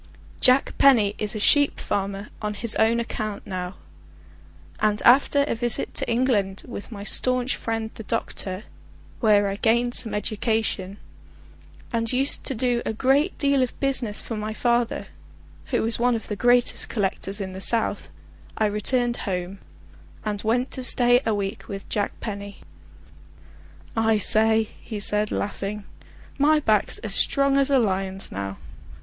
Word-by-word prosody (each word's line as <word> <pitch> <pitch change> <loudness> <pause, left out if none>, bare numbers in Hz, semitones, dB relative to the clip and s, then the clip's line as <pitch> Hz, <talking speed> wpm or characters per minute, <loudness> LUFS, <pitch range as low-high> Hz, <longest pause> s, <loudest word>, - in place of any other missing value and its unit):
Jack 255 +2 +4
Penny 225 -7 +5
is 210 +1 -3
a - - -3
sheep 285 +6 +4
farmer 200 +1 -3
on 210 -1 -3
his 225 +1 +1
own 225 +1 +3
account 215 -3 -4
now, 180 0 -5 1.0
and 210 0 +1
after 280 +3 +5
a 285 - -1
visit 235 0 0
to - - -2
England 230 -6 0
with 240 -2 -8
my 200 -2 -7
staunch 255 +4 0
friend 225 -1 -4
the - - -9
doctor, 205 -3 -3 0.6
where 205 -3 +4
I 195 0 -3
gained 235 +3 +1
some 225 -3 0
education, 210 -2 -2 1.0
and 230 -1 0
used 265 +2 +1
to 265 - -1
do 240 0 0
a - - -3
good 270 - +1
deal 280 -2 +2
of 255 - -2
business 260 -6 +1
for 230 - -6
my 215 0 -4
father, 240 0 0 0.6
who - - -1
is 225 +1 -2
one 245 0 +2
of 225 - -6
the 210 - -2
greatest 245 +3 +2
collectors 195 -1 -2
in 190 -2 -5
the 190 - -7
south, 225 +2 +2 0.5
I 220 - +2
returned 240 +4 +1
home, 180 +1 -4 0.7
and 205 -1 -2
went 245 +4 0
to 260 - -1
stay 245 0 +4
a 220 - +1
week 200 +2 -4
with 195 -1 -7
Jack 205 -1 -2
Penny. 200 -2 -7 1.3
"I 225 -1 +2
say," 220 +2 +4 0.2
he 215 - -6
said 210 +1 +1
laughing, 205 +1 -4 0.6
"my 305 +2 +4
back's 215 -7 +1
as 210 -3 -5
strong 275 +5 +2
as 275 0 +2
a 275 - +4
lion's 195 -4 -1
now. 100 0 -5
220 Hz, 155 wpm, -24 LUFS, 205-245 Hz, 1.3 s, Penny